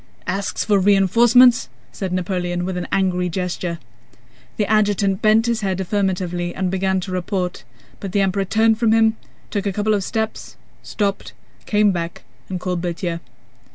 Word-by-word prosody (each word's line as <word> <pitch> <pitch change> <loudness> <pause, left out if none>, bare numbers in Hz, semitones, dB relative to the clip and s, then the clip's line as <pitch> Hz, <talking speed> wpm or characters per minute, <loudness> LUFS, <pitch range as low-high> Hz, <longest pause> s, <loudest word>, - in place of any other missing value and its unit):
"Asks 195 0 -2
for 205 -2 +3
reinforcements?" 225 - +5 0.2
said 190 -2 -5
Napoleon 180 -1 -2
with 185 0 -3
an 180 - -4
angry 180 -2 +1
gesture. 180 -1 -3 0.8
The 210 - +1
adjutant 205 -2 +1
bent 220 +1 +4
his 235 -2 0
head 190 -2 -1
affirmatively 180 -2 -1
and 185 -1 -1
began 190 0 0
to 185 - -6
report, 180 0 -3 0.4
but 195 - -6
the 200 +1 +2
Emperor 195 0 0
turned 220 +2 +2
from 225 -2 +3
him, 225 0 +4 0.4
took 205 -1 -2
a - - +1
couple 215 +2 +1
of 200 -2 0
steps, 220 +3 -4 0.2
stopped, 200 -2 -3 0.3
came 210 -1 +3
back, 170 -2 -4 0.3
and 185 -1 -3
called 180 -1 -2
Berthier. 175 -1 -3
195 Hz, 155 wpm, -20 LUFS, 180-210 Hz, 0.8 s, reinforcements